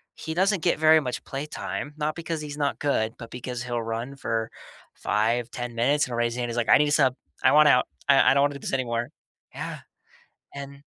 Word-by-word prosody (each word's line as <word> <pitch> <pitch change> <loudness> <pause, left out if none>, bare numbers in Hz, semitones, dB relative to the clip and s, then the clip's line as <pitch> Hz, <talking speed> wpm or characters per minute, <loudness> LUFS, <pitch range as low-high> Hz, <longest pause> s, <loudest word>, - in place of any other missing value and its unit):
He 160 - -5
doesn't 190 -1 +2
get 175 - +2
very 155 0 +6
much 125 -4 -4
playtime, 145 +1 -5
not 155 0 -1
because 165 -1 -4
he's 150 -1 -7
not 145 -1 -1
good, 115 -6 0
but 115 -1 -9
because 125 0 -5
he'll 120 -2 -2
run 115 +4 -4
for 115 -4 -2 0.5
5, 115 +3 0
10 120 -1 -5
minutes 140 +6 +2
and 125 - -10
he'll 120 - -3
raise 120 0 +1
his 125 - -5
hand. 120 -1 -2
He's 115 - -4
like, 120 - 0
"I - - +8
need 150 - +3
a - - -1
sub. 135 -4 +4 0.3
I 130 - +6
want 150 0 +7
out. 125 - +5 0.2
I - - +6
I - - +5
don't 140 - +4
wanna 145 0 +1
do 140 - -7
this - - -5
anymore." 120 -1 -1 0.5
Yeah, - - -5 0.8
and 140 0 -9
135 Hz, 230 wpm, -25 LUFS, 120-150 Hz, 0.8 s, I